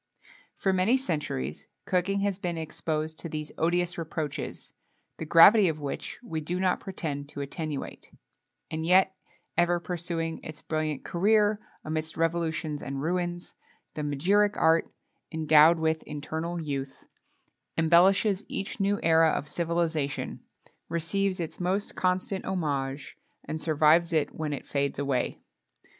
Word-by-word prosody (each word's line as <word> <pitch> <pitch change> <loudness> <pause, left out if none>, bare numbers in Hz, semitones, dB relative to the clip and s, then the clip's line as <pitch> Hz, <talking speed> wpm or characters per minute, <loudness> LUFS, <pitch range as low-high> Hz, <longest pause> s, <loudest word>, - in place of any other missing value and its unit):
For 190 - +1
many 190 +8 +3
centuries 145 - -3 0.2
cooking 195 +2 +1
has 200 -1 0
been 175 -3 -2
exposed 155 0 -3
to 170 - -6
these 155 0 -5
odious 175 +1 +1
reproaches, 155 -3 -5 0.5
the 160 - -5
gravity 190 +6 +8
of 155 -1 -3
which 140 -2 -5
we 160 -10 -4
do 175 +4 -2
not 185 -1 +2
pretend 145 -7 -5
to 145 - -6
attenuate; 150 +1 -5 0.6
and 160 0 -2
yet, 185 +3 +4 0.4
ever 175 0 +3
pursuing 165 -1 -4
its 155 -1 -8
brilliant 155 -3 -3
career 210 +3 +3 0.3
amidst 155 0 -3
revolutions 160 -2 -1
and 135 0 -4
ruins, 175 +1 -2 0.4
the 155 - -4
magiric 185 +9 +2
art, 160 +1 +3 0.4
endowed 160 0 +6
with 160 0 0
eternal 160 +3 -4
youth, 140 -4 -5 0.7
embellishes 185 +5 +4
each 195 +3 -4
new 200 +1 +1
era 160 0 +5
of 150 - -2
civilization, 165 -3 -1 0.5
receives 185 +3 0
its 165 -2 -5
most 185 +3 -1
constant 185 +1 0
homage, 140 -7 -3 0.3
and 155 0 -4
survives 160 +2 +4
it 155 -2 +1
when 155 -1 -3
it 140 - -5
fades 140 0 -1
away. 140 -2 -1
165 Hz, 130 wpm, -28 LUFS, 155-180 Hz, 0.7 s, gravity